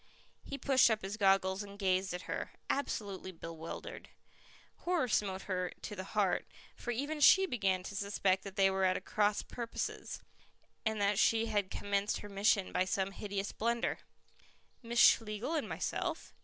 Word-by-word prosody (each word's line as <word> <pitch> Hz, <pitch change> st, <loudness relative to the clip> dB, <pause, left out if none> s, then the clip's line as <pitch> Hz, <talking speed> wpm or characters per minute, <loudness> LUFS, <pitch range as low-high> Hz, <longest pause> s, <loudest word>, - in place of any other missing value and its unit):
He 275 Hz, -, -6 dB
pushed 270 Hz, -3 st, +5 dB
up 220 Hz, -3 st, 0 dB
his 195 Hz, +2 st, -3 dB
goggles 195 Hz, -2 st, +3 dB
and 200 Hz, -1 st, -9 dB
gazed 190 Hz, -1 st, +1 dB
at 180 Hz, 0 st, -5 dB
her, -, -, -4 dB, 0.2 s
absolutely 200 Hz, -9 st, -3 dB
bewildered. 165 Hz, -1 st, -8 dB, 0.7 s
Horror 345 Hz, -7 st, 0 dB
smote 195 Hz, -4 st, 0 dB
her 180 Hz, -2 st, -2 dB
to 210 Hz, -, -5 dB
the 185 Hz, -, -5 dB
heart, 195 Hz, -3 st, +2 dB, 0.3 s
for -, -, -8 dB
even 285 Hz, +6 st, -2 dB
she 380 Hz, +6 st, +7 dB
began 195 Hz, -, 0 dB
to 200 Hz, -, -7 dB
suspect 200 Hz, -2 st, +1 dB
that 195 Hz, -1 st, -8 dB
they 195 Hz, -1 st, +4 dB
were 190 Hz, 0 st, 0 dB
at 185 Hz, 0 st, +1 dB
cross 210 Hz, -1 st, +1 dB
purposes, 235 Hz, -1 st, -5 dB, 0.6 s
and 220 Hz, -1 st, -1 dB
that 200 Hz, 0 st, +2 dB
she 225 Hz, 0 st, +4 dB
had 205 Hz, -4 st, 0 dB
commenced 200 Hz, +1 st, -1 dB
her 205 Hz, -, -8 dB
mission 200 Hz, -1 st, +2 dB
by 180 Hz, -, +2 dB
some 190 Hz, +1 st, -1 dB
hideous 200 Hz, 0 st, -4 dB
blunder. 235 Hz, +1 st, -1 dB, 0.8 s
"Miss 235 Hz, -1 st, -5 dB
Schlegel 225 Hz, +7 st, +4 dB
and 315 Hz, -, -1 dB
myself." -, -, -3 dB
200 Hz, 160 wpm, -33 LUFS, 190-225 Hz, 0.8 s, she